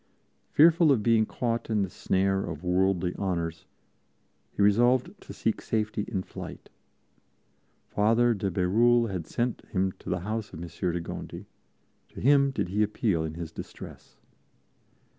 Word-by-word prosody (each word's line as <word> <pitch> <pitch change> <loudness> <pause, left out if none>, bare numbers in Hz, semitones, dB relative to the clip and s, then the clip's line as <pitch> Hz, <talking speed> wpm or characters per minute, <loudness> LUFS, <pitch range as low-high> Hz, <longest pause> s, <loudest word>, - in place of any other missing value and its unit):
Fearful 165 0 +5
of 120 -6 +2
being 115 -1 +3
caught 115 -2 -2
in 105 -2 +1
the 95 - -3
snare 95 +1 0
of 80 0 -6
worldly 90 0 +1
honors, 85 -4 -2 0.9
he 100 - 0
resolved 120 +5 +3
to - - -11
seek - - -2
safety 105 -1 -1
in 95 -5 -2
flight. - - -9 1.2
Father 115 +3 +3
de 100 -2 -2
Bérulle 115 +6 +3
had 90 -4 -4
sent 120 0 -2
him 95 -1 0
to - - -9
the 90 -1 -1
house 105 +2 -4
of 80 - -7
Monsieur 85 +1 -3
de 85 0 -3
Gondi; - - -7 0.6
to - - -11
him 140 +1 +4
did 125 -9 -2
he 105 +3 0
appeal 105 -5 +1
in 80 0 -5
his 85 -1 -6
distress. - - -10
100 Hz, 150 wpm, -27 LUFS, 90-115 Hz, 1.2 s, Fearful